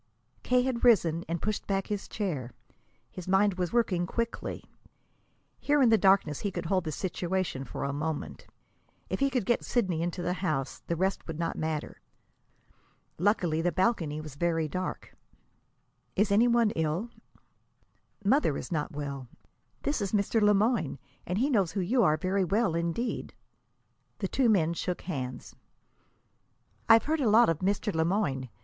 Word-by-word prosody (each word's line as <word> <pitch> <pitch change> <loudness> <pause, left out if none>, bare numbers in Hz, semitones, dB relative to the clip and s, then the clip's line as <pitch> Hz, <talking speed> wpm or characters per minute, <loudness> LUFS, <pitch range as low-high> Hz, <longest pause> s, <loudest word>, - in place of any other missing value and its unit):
K. 250 0 +2
had 250 -2 -2
risen 175 -9 +4
and 170 0 -3
pushed 215 -1 -2
back 195 -1 0
his 205 -2 -4
chair. 155 - -3 0.6
His 180 -1 -9
mind 190 0 +3
was 180 -2 -1
working 185 -7 +1
quickly. 230 +4 -3 1.0
Here 290 0 +2
in 255 -4 +5
the 225 - +6
darkness 190 -7 +3
he 205 - -2
could 175 -2 -5
hold 185 +1 0
the 155 - -2
situation 175 -3 -2
for - - -5
a 140 - -2
moment. 150 +1 -4 0.6
If - - -2
he 275 0 +3
could 250 -6 -1
get 240 - +1
Sidney 185 -9 0
into 175 +1 -3
the 180 - 0
house, 155 -8 -2
the 170 - 0
rest 190 +3 -1
would 165 -2 -5
not 165 0 -2
matter. 155 -1 -4 1.2
Luckily, 175 -4 +2
the 175 +1 +1
balcony 180 -7 0
was 155 -2 -8
very 165 +1 0
dark. 185 +5 -5 1.0
"Is 205 +1 +2
any 220 +4 +5
one 235 -2 +3
ill?" 165 +8 -2 1.1
"Mother 210 - +3
is - - -7
not 150 -3 -2
well. 140 -3 -5 0.6
This 285 -5 -1
is 195 0 -2
Mr. 210 +2 +2
Le 210 0 +5
Moyne, 210 - +1 0.3
and 180 - -1
he 255 +6 +2
knows 200 - +1
who 200 - -1
you 225 +8 +2
are 155 -7 +4
very 190 +4 0
well, 195 +1 +1
indeed." 170 +8 -2 0.8
The - - -2
two 260 -3 +2
men 170 -6 +3
shook 180 +1 -3
hands. 130 -8 -5 1.4
"I've 225 0 +8
heard 310 0 0
a 240 - +3
lot 225 +1 +6
of 165 -2 0
Mr. 200 +2 0
Le 160 - +2
Moyne. 145 - -1
185 Hz, 165 wpm, -29 LUFS, 160-215 Hz, 1.4 s, I've